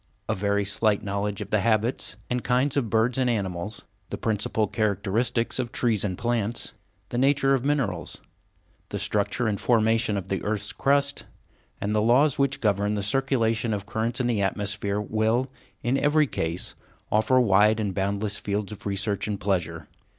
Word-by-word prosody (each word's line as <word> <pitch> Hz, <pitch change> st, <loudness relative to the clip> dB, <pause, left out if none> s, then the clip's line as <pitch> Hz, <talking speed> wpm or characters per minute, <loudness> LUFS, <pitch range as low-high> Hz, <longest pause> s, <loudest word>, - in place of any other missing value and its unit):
A 110 Hz, -, +1 dB
very 100 Hz, 0 st, 0 dB
slight 105 Hz, +1 st, +1 dB
knowledge 100 Hz, 0 st, -2 dB
of -, -, -7 dB
the 105 Hz, -, +3 dB
habits 115 Hz, +3 st, 0 dB
and 125 Hz, 0 st, -2 dB
kinds 130 Hz, +3 st, +1 dB
of 130 Hz, -6 st, 0 dB
birds 115 Hz, +4 st, +2 dB
and 125 Hz, -1 st, +2 dB
animals, 100 Hz, -2 st, -3 dB, 0.2 s
the -, -, -4 dB
principal 110 Hz, 0 st, 0 dB
characteristics 110 Hz, +4 st, 0 dB
of 120 Hz, -2 st, -2 dB
trees 115 Hz, -5 st, +1 dB
and 95 Hz, -4 st, -2 dB
plants, 120 Hz, -1 st, -1 dB, 0.4 s
the 120 Hz, -, -2 dB
nature 135 Hz, 0 st, +3 dB
of 130 Hz, -3 st, +1 dB
minerals, 140 Hz, -5 st, -1 dB, 0.7 s
the -, -, -3 dB
structure 105 Hz, +4 st, 0 dB
and 105 Hz, -2 st, -1 dB
formation 115 Hz, -2 st, +2 dB
of 95 Hz, -2 st, -4 dB
the 95 Hz, -, -2 dB
earth's 105 Hz, -1 st, -2 dB
crust, 140 Hz, +1 st, +1 dB, 0.5 s
and 105 Hz, +1 st, -2 dB
the 105 Hz, -, +2 dB
laws 130 Hz, +6 st, +4 dB
which 140 Hz, -1 st, +1 dB
govern 105 Hz, -1 st, +1 dB
the 100 Hz, -, -2 dB
circulation 115 Hz, -2 st, +1 dB
of 100 Hz, 0 st, -6 dB
currents 110 Hz, +4 st, -2 dB
in 125 Hz, -, 0 dB
the 115 Hz, -4 st, +1 dB
atmosphere 100 Hz, 0 st, -1 dB
will, 110 Hz, +5 st, 0 dB, 0.3 s
in 130 Hz, +3 st, +1 dB
every 150 Hz, +2 st, +3 dB
case, 85 Hz, -, -3 dB, 0.4 s
offer 110 Hz, +4 st, +4 dB
wide 105 Hz, -1 st, +4 dB
and 100 Hz, -3 st, -1 dB
boundless 100 Hz, +2 st, -1 dB
fields 105 Hz, 0 st, -3 dB
of 105 Hz, -, -7 dB
research 100 Hz, +1 st, -1 dB
and 105 Hz, -2 st, -3 dB
pleasure. 85 Hz, -6 st, -2 dB
110 Hz, 170 wpm, -26 LUFS, 100-120 Hz, 0.7 s, laws